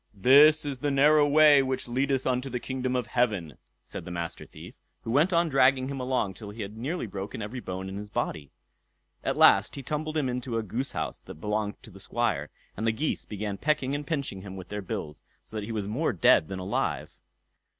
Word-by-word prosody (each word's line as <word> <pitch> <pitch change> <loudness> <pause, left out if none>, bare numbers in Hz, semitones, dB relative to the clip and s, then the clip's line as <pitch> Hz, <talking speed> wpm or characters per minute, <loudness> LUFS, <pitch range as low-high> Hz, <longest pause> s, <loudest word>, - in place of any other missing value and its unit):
"This 145 +9 +6
is 140 -3 -4
the 145 - 0
narrow 145 +2 +5
way 150 -1 +7
which 130 -1 -2
leadeth 135 +2 0
unto 130 +1 0
the 125 -1 -3
kingdom 130 0 -3
of 125 -2 0
heaven", 105 - -1 0.2
said - - -8
the - - -8
Master 85 -1 -5
Thief, - - -12 0.3
who 115 - -4
went 150 +9 +3
on 170 -1 +3
dragging 135 -2 +3
him 140 -1 -4
along 125 -6 -1
till 105 +1 -10
he 105 +1 -6
had 100 +2 -8
nearly 135 +7 -3
broken 100 0 -6
every 115 +5 -5
bone 95 -4 -5
in 95 +1 -6
his 105 0 -7
body. 75 -8 -3 0.7
At - - -1
last - - +5
he 140 - -7
tumbled 155 +3 -3
him 145 -4 +1
into 125 -1 -3
a 115 - -1
goose 120 +7 -3
house - - -4
that - - -10
belonged 105 +4 -3
to 115 - -13
the 95 - -13
Squire, 95 -9 -1 0.3
and 110 +3 -2
the - - +4
geese 145 +8 -2
began 105 -1 -5
pecking 140 -3 0
and 145 0 -4
pinching 140 - -3
him 95 -1 -8
with 95 -2 -9
their 105 0 -4
bills, 75 -5 -6 0.2
so - - -12
that 105 -1 -3
he 115 - -6
was 105 -3 -3
more 130 +10 0
dead 120 -10 +4
than 95 - -5
alive. 95 +2 -2
125 Hz, 220 wpm, -27 LUFS, 100-140 Hz, 0.7 s, way